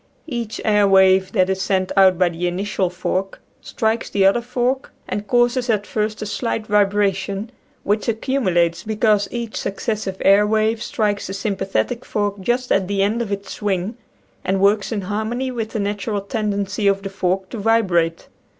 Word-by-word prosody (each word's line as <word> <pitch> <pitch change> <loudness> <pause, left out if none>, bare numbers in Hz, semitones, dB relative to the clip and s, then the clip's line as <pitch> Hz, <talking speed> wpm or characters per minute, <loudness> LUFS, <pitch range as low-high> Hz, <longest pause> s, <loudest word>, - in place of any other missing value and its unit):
Each 235 -7 -4
air 210 -2 +4
wave 190 -1 +5
that 185 -4 +3
is 190 0 -1
sent 190 -1 0
out 190 -2 +5
by 180 -1 +3
the 175 +1 -3
initial 190 +1 -1
fork 185 +2 -3 0.2
strikes 225 -1 -1
the 195 -1 +2
other 195 +5 +4
fork 250 +2 -1 0.2
and 210 0 -4
causes 245 +2 +2
at 210 -2 +1
first 215 0 -2
a - - -4
slight 215 +1 -2
vibra 205 -1 +3
tion 195 +4 -5 0.3
which 210 +2 0
accumulates, 190 -8 +1
because 215 -2 +1
each 235 -2 -5
succes 205 +2 -2
sive 190 -3 -4
air 200 +2 +5
wave 220 +1 +1
strikes 205 -2 -1
the 190 - -5
sympathetic 200 +4 -2
fork 205 -1 -2
just 245 +6 -1
at 190 -2 +2
the 200 0 +1
end 215 +4 0
of 220 -4 -4
its 200 0 -4
swing 195 +1 -2 0.5
and 190 +1 0
works 200 +2 +2
in 215 -3 -1
harmony 220 +6 -2
with 225 -3 -3
the 220 - -4
natural 205 +1 -2
tendency 200 0 -2
of 195 0 +2
the 195 - -4
fork 190 0 -1
to 230 - -6
vi 225 +2 +3
brate. 170 -3 0
205 Hz, 180 wpm, -20 LUFS, 195-220 Hz, 0.5 s, wave